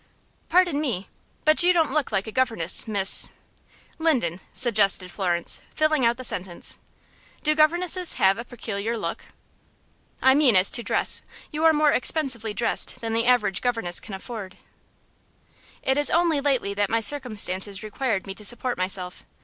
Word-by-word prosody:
"Pardon 345 -4 +2
me, 225 -10 -4 0.4
but 310 +2 +5
you 355 +1 +5
don't 325 -4 +1
look 300 -5 -1
like 195 -1 -1
a 220 - -7
governess, 225 -8 0
Miss 200 -3 +4 0.3
" - - -32
"Linden," 240 - 0
suggested 200 -6 +2
Florence, 175 -3 -1
filling 310 -5 +1
out 235 0 0
the 255 - -8
sentence. 180 -6 0 0.6
"Do 305 - +2
governesses 345 +3 +2
have 195 +3 +2
a - - -5
peculiar 230 -2 -5
look?" - - -6 0.9
"I 265 - +4
mean 275 -6 +3
as 185 +1 +4
to 240 - -2
dress. - - +1 0.3
You 310 +1 -2
are 325 - +7
more 300 -1 +2
expensively 255 -6 0
dressed 230 +3 0
than 225 -1 -4
the 230 +1 0
average 210 -6 +2
governess 225 -8 -1
can 200 - -9
afford." 195 -2 -9 1.3
"It 265 +2 +1
is 290 - +4
only 335 -4 +1
lately 265 -8 -1
that 205 -1 -1
my 230 - +1
circumstances 210 -6 +1
required 215 -1 -3
me 195 - -7
to 210 - -8
support 240 +1 -1
myself. 185 -1 -4
235 Hz, 160 wpm, -23 LUFS, 195-290 Hz, 1.3 s, are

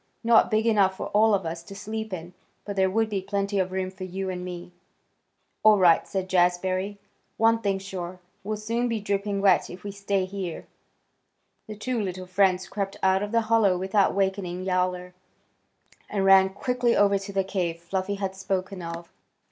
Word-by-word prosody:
Not 230 -1 +5
big 220 +1 +1
enough 200 -4 +3
for - - -5
all 215 0 +4
of 190 -3 -3
us 165 +1 -4
to 195 +4 -11
sleep 220 +2 -5
in, 175 -1 -6 0.3
but 205 - -5
there 190 -1 +3
would 225 +3 +1
be 200 -3 -2
plenty 200 +1 -1
of 185 0 0
room 185 0 -2
for 190 0 -9
you 190 +1 -4
and 180 -1 -5
me." 180 -1 -7 0.9
"All 215 -1 +6
right," 175 -4 +4
said 190 -1 -3
Jazbury. 185 +2 +1 0.4
"One 225 0 +4
thing's 195 -3 -1
sure, 185 -2 -6 0.2
we'll 215 +2 -3
soon 230 +3 -1
be 230 -2 -1
dripping 200 0 -1
wet 195 - +4
if 180 +1 -10
we 205 - -5
stay 200 -1 -1
here." 185 -3 -6 1.0
The 215 - -7
two 235 +2 -2
little 185 -2 -4
friends 185 0 +2
crept 195 -1 -4
out 190 0 +3
of 205 0 -3
the 230 0 +3
hollow 220 -4 +3
without 190 +2 +1
wakening 190 -2 -1
Yowler, 180 -1 -1 1.0
and 195 -2 0
ran 190 0 +7
quickly 245 +4 0
over 200 -1 +4
to 195 +1 -7
the 195 -1 +1
cave 180 -3 -2
Fluffy 190 +3 -3
had 195 -1 -4
spoken 190 0 -3
of. 170 0 -7
195 Hz, 185 wpm, -26 LUFS, 185-205 Hz, 1.0 s, ran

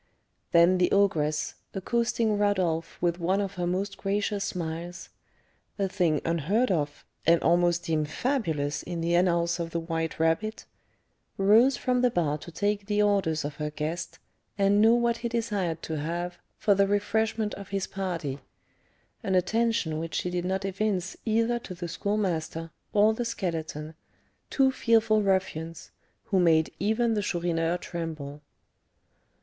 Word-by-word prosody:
Then 175 +1 +5
the 180 - +3
ogress, 155 -7 +2 0.2
accosting 230 +2 +1
Rodolph 185 -5 0
with 175 0 +1
one 185 +3 +1
of 200 -1 -2
her 175 -2 -2
most 195 +3 -2
gracious 200 +1 -1
smiles, 175 -2 -5 0.7
a 200 -2 +1
thing 175 -6 +1
unheard 180 - +1
of, 150 -4 -2 0.2
and 170 0 +6
almost 175 0 +3
deemed 155 -3 0
fabulous, 160 - -1
in 170 -1 -5
the 170 +1 0
annals 170 -1 +2
of 170 -1 -2
the 170 - -2
White 165 -1 -3
Rabbit, 165 +7 0 0.7
rose 220 +7 +5
from 250 -1 +1
the 250 - +4
bar 155 -8 0
to 165 +3 -10
take 205 +3 -1
the 210 0 +2
orders 190 -7 +1
of 145 -1 -5
her 150 0 -2
guest, 155 +3 -4 0.4
and 200 +1 +4
know 225 +2 +6
what 235 -1 +1
he 235 0 -3
desired 205 -8 -2
to 160 -2 -3
have 175 +3 -3 0.2
for 205 - +3
the 200 0 +3
refreshment 215 +1 0
of 200 -1 -8
his 195 -1 -1
party, 170 -8 -4 0.8
an 190 - 0
attention 185 -4 +1
which 165 0 -5
she 180 - -1
did 175 0 -2
not 190 +1 -1
evince 195 -1 -1
either 230 +2 +2
to 185 -5 -8
the 175 0 -5
Schoolmaster 165 -4 -2 0.2
or 210 +1 +4
the 240 - -2
Skeleton, 165 -8 -4 0.6
two 265 -1 +3
fearful 225 -3 +3
ruffians, 185 -4 -1 0.3
who 195 - +1
made 160 -3 +4
even 220 +4 +1
the 210 - 0
Chourineur 170 -3 0
tremble. 155 -5 -6
180 Hz, 150 wpm, -27 LUFS, 165-210 Hz, 0.8 s, and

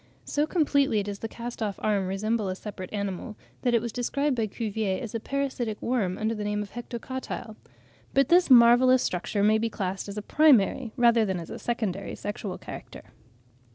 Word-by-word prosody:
So 295 +1 0
completely 280 - +2
does 200 0 -5
the 225 - -4
cast 235 +1 -7
off 205 -3 -1
arm 200 -3 0
resemble 210 +2 -1
a 185 - -2
separate 185 -2 -8
animal, 200 +2 -4 0.2
that 245 -2 +2
it 230 - +2
was 235 - -3
described 280 +4 0
by 225 -2 0
Cuvier 210 -3 -2
as 230 -5 -6
a 230 - -1
parasitic 260 -4 -2
worm 210 -7 -1
under 220 +1 -1
the 210 -2 -4
name 210 0 -1
of 200 - -12
Hectocotyle. 240 -1 -6 0.6
But 275 -1 +4
this 350 -1 +5
marvellous 250 +1 +7
structure 190 +3 -1
may 215 +1 +4
be 230 +1 0
classed 195 -1 -4
as 200 - -7
a 210 - -4
primary 260 -4 +4
rather 235 -2 +5
than 190 -4 -1
as 165 - -8
a - - -6
secondary 210 -5 -3
sexual 205 -2 -5
character. - - -10
220 Hz, 190 wpm, -27 LUFS, 205-245 Hz, 0.6 s, marvellous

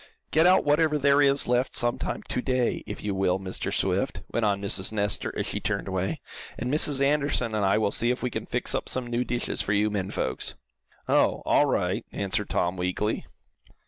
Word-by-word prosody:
"Get 160 +3 +5
out 185 +1 +4
wherever 150 +1 +3
there 140 0 +4
is 140 0 +3
left 125 +1 +1
some 120 0 0
time - - -4
to 125 - -2
day, 125 -2 0
if - - -6
you 105 -1 -1
will, 95 -1 +1
Mr. 95 -1 -3
Swift," - - 0
went 115 - 0
on 100 -2 +1
Mrs. 100 -1 +2
Nestor, 105 -1 -1
as - - -1
she - - -3
turned 100 -2 -2
away, 95 0 -2 0.4
"and 125 +3 -2
Mrs. 145 -2 +4
Anderson 140 -5 0
and 105 -1 0
I 95 +1 +3
will 110 -2 +1
see 120 - +1
if 125 +1 -1
we 125 - -1
can - - -5
fix - - -2
up - - -2
some 130 -1 -2
new 120 +1 -1
dishes 120 -1 -1
for 100 - 0
you 105 +1 +2
men 95 -2 -2
folks." - - -2 0.5
"Oh - - +2
all - - +4
right," - - 0
answered 100 +1 -2
Tom, 90 +1 0
weakly. 90 +4 -2
115 Hz, 210 wpm, -26 LUFS, 100-135 Hz, 0.5 s, Get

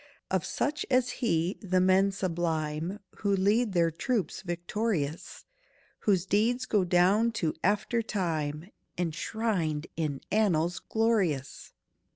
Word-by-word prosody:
Of 190 -2 +1
such 290 +9 -1
as 255 -1 +3
he, 175 -5 +1
the 185 -2 +1
men 190 +2 +4
sublime 165 -1 -2 0.2
Who 200 -1 +1
lead 205 +3 +2
their 170 -2 +3
troops 205 - -2
victorious, 175 -3 -3 0.5
Whose 190 -4 +2
deeds 225 +6 +1
go 205 -3 +2
down 185 +6 +3
to 165 -8 -1
after 210 +4 +1
time, 165 -5 -2 0.3
Enshrined 170 -2 -1
in 150 -4 -2
annals 175 -5 +2
glorious! 195 - -1
185 Hz, 115 wpm, -29 LUFS, 165-215 Hz, 0.5 s, men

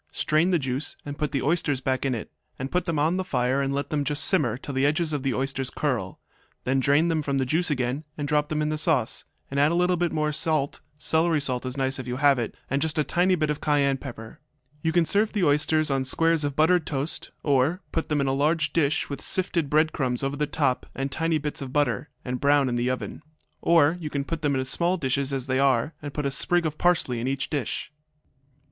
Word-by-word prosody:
Strain 155 +4 +1
the 180 - +3
juice 135 0 -3
and 145 0 -5
put 150 0 -2
the 140 -3 -1
oysters 145 -2 +1
back 130 +1 -1
in 130 - 0
it, 115 - -7 0.3
and 135 +1 -5
put 180 0 0
them 165 -2 0
on 160 +5 +2
the 185 - -1
fire 130 -5 0
and 135 0 -1
let 140 +1 -3
them 150 -2 0
just 145 +2 +2
simmer 145 - +2
till 140 +2 -7
the 135 0 0
edges 155 +2 +1
of 145 - -1
the 135 -1 -1
oysters 135 0 -1
curl; 125 -11 -2 0.4
then 135 +1 +1
drain 145 +5 +3
them 165 -2 +1
from 140 -2 -1
the 130 - +1
juice 165 +7 +1
again 130 +1 -1
and 145 -1 -3
drop 150 -1 +1
them 155 0 0
in 150 - 0
the 155 0 -1
sauce, 150 -8 +1 0.3
and 140 - -1
add 145 +2 +4
a - - +1
little 180 0 +2
more 150 0 0
salt 155 -2 0
(celery 160 +2 +2
salt 130 -2 -2
is 130 +2 -3
nice 135 0 -1
if 130 - -6
you 125 - -2
have 140 -1 +4
it), 115 - -3
and 140 +2 -1
just 160 -1 0
a 150 - +3
tiny 180 +4 +2
bit 155 -3 0
of 150 - -4
cayenne 140 -2 +2
pepper. 120 -5 -9 0.4
You 160 - +1
can 170 0 +3
serve 210 +5 +1
the 205 -4 0
oysters 155 0 +2
on 135 -1 +1
squares 165 +4 +2
of 145 -1 -2
buttered 160 +2 +3
toast, 145 +2 -2
or 145 +6 +2
put 165 - -2
them 150 -1 +1
in 140 - +1
a 135 - +1
large 155 +3 +1
dish, 160 -1 +1
with 140 - -6
sifted 175 -5 0
bread 155 +2 +3
crumbs 130 -3 -1
over 135 +1 -1
the 150 0 0
top 130 -3 0
and 135 0 -3
tiny 165 +2 0
bits 150 -1 -4
of 135 -2 -6
butter, 145 0 0 0.2
and 125 -1 -3
brown 140 -2 +4
in 120 - -1
the 120 +1 0
oven. 130 +4 -4 0.4
Or 165 0 +4
you 155 -3 -5
can 140 -1 -2
put 165 +1 -4
them 145 -3 +1
in 130 0 -1
small 175 +7 +1
dishes 135 -2 0
as 135 -2 -2
they 130 0 0
are, 135 +2 +2
and 145 -1 -6
put 145 0 -3
a 140 - 0
sprig 175 +5 +1
of 155 -1 -3
parsley 165 -9 +2
in 120 - -2
each 135 0 -2
dish. 145 -1 -3
145 Hz, 245 wpm, -25 LUFS, 135-160 Hz, 0.4 s, add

